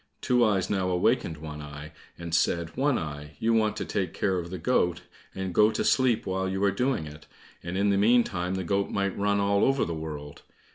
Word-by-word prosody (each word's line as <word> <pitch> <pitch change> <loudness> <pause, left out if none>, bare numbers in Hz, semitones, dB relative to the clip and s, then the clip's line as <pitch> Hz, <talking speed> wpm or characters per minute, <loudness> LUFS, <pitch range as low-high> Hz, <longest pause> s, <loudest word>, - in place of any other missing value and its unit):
Two 125 -1 +2
eyes 100 -5 +2
now 95 -2 0
awakened 90 -2 +1
One 75 -1 -8
eye, 75 +1 -9 0.3
and 85 -1 -7
said, 85 -1 +1
"One 140 -1 +2
eye, 75 -1 -6
you 115 +6 +1
want 110 -1 +2
to - - -3
take 95 -2 -2
care 95 -2 0
of 85 0 -6
the 95 - -5
goat, 90 -2 +1 0.3
and 95 -1 -4
go 105 +4 +5
to - - -1
sleep 130 -4 +2
while 95 0 -1
you 95 +1 -2
are 100 - +4
doing 125 - -1
it, 75 +1 -11 0.3
and 85 +2 -4
in 100 +1 +2
the 100 - +2
meantime 100 -5 +2
the 95 - -2
goat 100 +3 0
might 100 -1 -1
run 100 0 +1
all 100 0 +2
over 135 0 +2
the 85 - -3
world. 75 -2 -7
95 Hz, 220 wpm, -27 LUFS, 80-105 Hz, 0.3 s, go